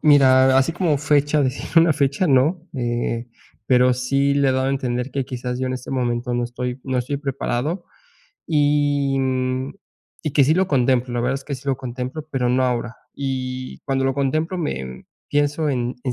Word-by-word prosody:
Mira, 130 -3 +6
así 135 +5 +3
como 170 -4 +1
fecha, 145 0 +2
decir 130 0 -2
una 165 -1 +6
fecha, 140 +4 +1
no, 155 +5 +2
eh, 120 -1 -2 0.4
pero 125 +1 +4
sí 135 +3 +1
le 140 -1 +3
he 130 - +3
dado 130 0 0
a - - +1
entender 125 -1 -2
que 135 -1 -2
quizás 125 0 -4
yo 130 - -1
en 130 - -2
este 130 - -7
momento 120 -1 -1
no 120 - 0
estoy 125 +1 -4
no 130 -1 -1
estoy 125 +3 -2
preparado. 140 +4 -2 0.6
Y, 145 -2 +2
mm, 130 0 -1 0.5
y 155 - -2
que 140 - +5
sí 150 +4 +3
lo 190 +2 +2
contemplo, 125 -2 +2
la 120 - 0
verdad 125 +3 0
es 135 - -5
que 140 - -4
sí 130 - -9
lo 135 -1 +1
contemplo, 130 +4 -5
pero 125 -3 0
no 130 +1 +2
ahora. 120 -1 -2 0.2
Y 130 -2 -4
cuando 135 -1 0
lo 135 0 +1
contemplo 155 +6 0
me 65 - -4 0.2
pienso 145 +1 +1
en 125 -1 -1
en 125 - 0
135 Hz, 195 wpm, -21 LUFS, 125-145 Hz, 0.6 s, Mira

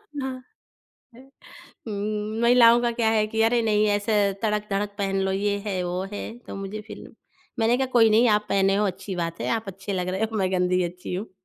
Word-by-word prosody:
न 265 -2 -3 0.8
है। 250 - -14 0.7
हुँ, 210 +1 -3
महिलाओं 235 0 +6
का 240 - +1
क्या 230 -2 +1
है 215 -1 +2
कि 225 0 0
अरे 235 +1 +3
नहीं, 215 -1 +2
ऐसे 205 +2 0 0.3
तड़क-धड़क 210 -1 -1
पहन 195 -1 0
लो। 190 0 0
ये 205 +1 0
है, 185 -3 -1
वो 180 +1 -2
है, 225 +3 -6
तो 240 - -10
मुझे 195 +2 -6
फिर - - -10 0.5
मैंने 230 +2 +3
कहा 265 - +1
कोई 225 -2 +6
नहीं, 230 +3 +5
आप 210 0 +2
पहने 195 0 +2
हो 210 0 +2
अच्छी 190 0 -5
बात 170 -1 -3
है, - - -2
आप 220 -3 -4
अच्छे 195 +1 -6
लग 180 -1 -2
रहे 190 +4 -2
हो - - -3
मैं 190 -1 0
गंदी 180 0 +1
अच्छी 180 +1 -6
हूँ। 200 +3 -5
210 Hz, 210 wpm, -24 LUFS, 195-225 Hz, 0.8 s, महिलाओं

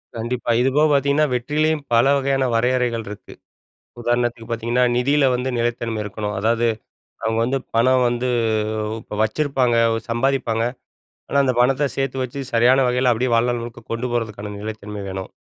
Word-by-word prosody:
கண்டிப்பா. 120 +1 -2
இது 130 - +3
போகப் 150 +1 +4
பார்த்தீங்கன்னா, 140 +2 +3
வெற்றிலயும் 150 +4 0
பல 115 +2 +5
வகையான 135 -1 0
வரையறைகள் 120 -1 +1
இருக்கு. 105 - -10 0.7
உதாரணத்துக்குப் 120 -1 -1
பார்த்தீங்கன்னா, 120 +2 +1
நிதில 140 +3 +2
வந்து 125 +1 -2
நிலைத்தன்மை 115 -1 -2
இருக்கணும். 105 +1 -4
அதாவது 115 +3 +1 0.6
அவங்க 110 0 0
வந்து 135 +2 0 0.2
பணம் 130 +2 +4
வந்து, 120 +1 -1 0.7
இப்ப 105 - -8
வச்சிருப்பாங்க, 130 +1 +1 0.3
சம்பாதிப்பாங்க, 120 -2 0 0.7
ஆனா 140 - 0
அந்தப் 130 -2 +1
பணத்த 135 +3 +3
சேத்து 135 -1 -2
வச்சு 130 +2 -4
சரியான 120 +3 +5
வகைல 125 0 +2
அப்டியே 120 +3 0
வாழ்நாள் 120 +1 +2
முழுக்க 115 0 -8
கொண்டு 115 +2 -2
போறதுக்கான 105 -3 -3
நிலைத்தன்மை 105 -1 -6
வேணும். 95 -1 -5
120 Hz, 145 wpm, -21 LUFS, 115-130 Hz, 0.7 s, பல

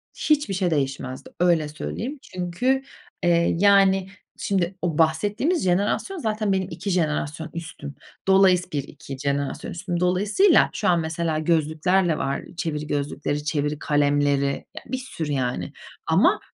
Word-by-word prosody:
Hiçbir 295 -9 +1
şey 185 -2 0
değişmezdi, 135 -3 -2
öyle 170 -3 +3
söyleyeyim. 235 - -5
Çünkü, 210 +10 -1 0.4
eee, 170 -1 +3
yani 195 -1 +4 0.3
şimdi 190 -2 -1
o 170 -4 -1
bahsettiğimiz 205 - +1
jenerasyon 200 - 0
zaten 215 - -1
benim 190 -1 0
2 170 +4 -5
jenerasyon 160 -2 -1
üstüm. 155 -4 -7 0.3
Dolayıs 190 -2 +4
1-2 140 -1 -5
jenerasyon 140 0 -2
üstüm. 175 0 -3
Dolayısıyla 205 - +4
şu 215 - -1
an 175 -1 +4
mesela 160 0 -1
gözlüklerle 160 +2 +2
var, 140 -2 -2 0.2
çeviri 150 -3 -3
gözlükleri, 145 0 -2
çeviri 150 -1 -1
kalemleri, 145 -1 +2 0.3
ya - - -5
bir 260 +2 -3
sürü 170 - -5
yani 125 -10 -2 0.3
ama - - +4
170 Hz, 130 wpm, -24 LUFS, 150-195 Hz, 0.4 s, yani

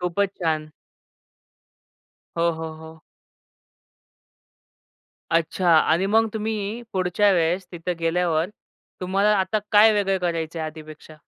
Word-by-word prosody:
खूपच 180 +3 0
छान. 155 -2 -1 1.7
हो, 170 0 +2
हो, 160 0 -6
हो. 160 0 -13 2.3
अच्छा. 165 +2 0
आणि 165 +4 +3
मग 225 +2 +3
तुम्ही 220 +1 -3
पुढच्या 185 +2 +2
वेळेस 175 +1 0
तिथे 175 +1 -4
गेल्यावर 165 0 0 0.5
तुम्हाला 195 +3 +2
आता 190 +3 0
काय 215 +1 +7
वेगळं 195 -2 +1
करायचंय 165 -2 -3
आधीपेक्षा? 155 0 -9
180 Hz, 100 wpm, -23 LUFS, 160-200 Hz, 2.3 s, काय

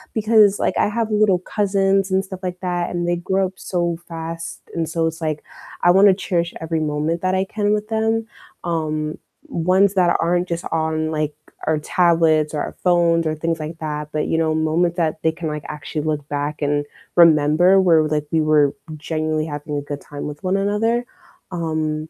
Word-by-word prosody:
because, 215 -2 +4
like, - - 0
I - - +3
have 225 +1 -2
little 210 -3 +3
cousins 195 0 +1
and 190 +1 +1
stuff 190 -1 -8
like 180 -1 -4
that, 175 -2 -1
and 175 0 -2
they 175 0 +1
grow 190 +2 0
up 185 - -12
so 175 -2 -2
fast, 165 0 -6
and 165 -1 -2
so 165 0 0
it's 165 +1 -3
like, 155 -1 -2 0.4
I 175 - +6
wanna 195 +1 +6
cherish 175 -2 -2
every 160 0 -2
moment 155 +2 -1
that 185 0 +1
I 190 - +2
can 205 +1 -1
with 210 0 -1
them, 225 0 0 0.4
um, 155 -2 -2 0.3
ones 185 +4 +2
that 180 -3 +3
aren't 175 +2 +1
just 170 -1 -4
on, 160 -1 -1
like, 155 -1 -2 0.3
our 160 - +2
tablets 160 -2 +2
or 150 - -1
our - - -5
phones 170 -2 +3
or 155 - -1
things 165 +1 -2
like 155 +2 -6
that, 150 -1 -4
but 155 0 -1
you - - 0
know, 160 -1 +1
moments 165 +2 +1
that 160 -2 -1
they 160 - +2
can, 165 0 -6
like, 150 -1 -4
actually 150 0 -5
look 150 -2 -2
back 145 +1 -3
and 145 0 0 0.3
remember 165 +3 +5
where, 170 -4 +5
like, 150 -1 -1
we 160 - +2
were 150 -2 +3 0.2
genuinely 155 0 -2
having 150 -1 -5
a 145 - -2
good 145 0 -6
time 145 -1 -7
with 150 +5 -8
one 185 +1 +1
another. 225 +4 0 0.5
Um, 155 -2 -2
165 Hz, 195 wpm, -21 LUFS, 155-185 Hz, 0.5 s, I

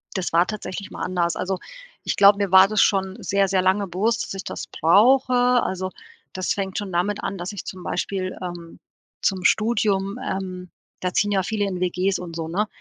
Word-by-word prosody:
Das 185 -4 -2
war 170 +2 +4
tatsächlich 200 -1 -6
mal - - -6
anders. 175 -2 0
Also, 185 0 -2 0.4
ich - - -1
glaube, 200 0 +7
mir 200 -3 -1
war 190 0 +8
das 215 -1 +2
schon 190 -1 +1
sehr, 200 0 +1
sehr 190 -1 +2
lange 190 +2 +1
bewusst, 210 +6 0
dass - - -7
ich 195 - -6
das - - -6
brauche. 250 - +4 0.3
Also, 185 0 -3 0.4
das 185 -1 -1
fängt 190 -1 -4
schon 205 -2 -4
damit 185 +4 -1
an, 195 - -3
dass 175 +3 -5
ich 205 - -7
zum 185 -1 -8
Beispiel, 185 0 -3
ähm, 175 -2 -8 0.4
zum 190 -2 0
Studium 210 -1 +1
ähm, 185 -4 -4 0.3
da 180 -1 -2
ziehen 205 +1 +1
ja 190 -2 +2
viele 210 +1 -1
in 185 -2 -3
WGs 185 +2 0
und 170 -2 -8
so, 165 -1 -4
ne? 205 +6 -1
190 Hz, 200 wpm, -23 LUFS, 180-200 Hz, 0.4 s, war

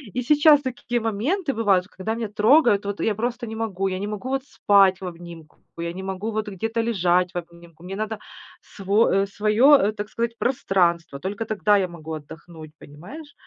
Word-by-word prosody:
И 250 - 0
сейчас 295 +2 +5
такие 245 -2 -3
моменты 265 - -1
бывают, 200 -5 +2
когда 195 +4 -2
меня 230 -1 -3
трогают, 210 0 +4
вот 200 0 -4
я 220 - +1
просто 240 +3 -3
не 220 - -6
могу, 200 -4 -2
я 185 0 -4
не 205 - -4
могу 210 +4 -5
вот 270 0 -1
спать 195 -8 +3
в - - -6
обнимку, 170 -3 -10 0.2
я 170 0 -3
не 185 - -7
могу 190 +3 -4
вот 215 0 -3
где-то 225 +4 -2
лежать 180 -5 +1
в - - -4
обнимку. 170 -1 -11
Мне 190 +2 -6
надо 215 +1 -3 0.4
сво 195 0 +1
своё, 215 +8 +4
э, 210 -4 +1
так 210 0 -6
сказать, 230 0 -3
пространство. 175 - 0
Только 200 +7 -4
тогда 210 -1 +2
я 190 -2 0
могу 165 -2 -10
отдохнуть, 155 +1 -10
понимаешь? 235 - -12
205 Hz, 185 wpm, -23 LUFS, 180-230 Hz, 0.4 s, сейчас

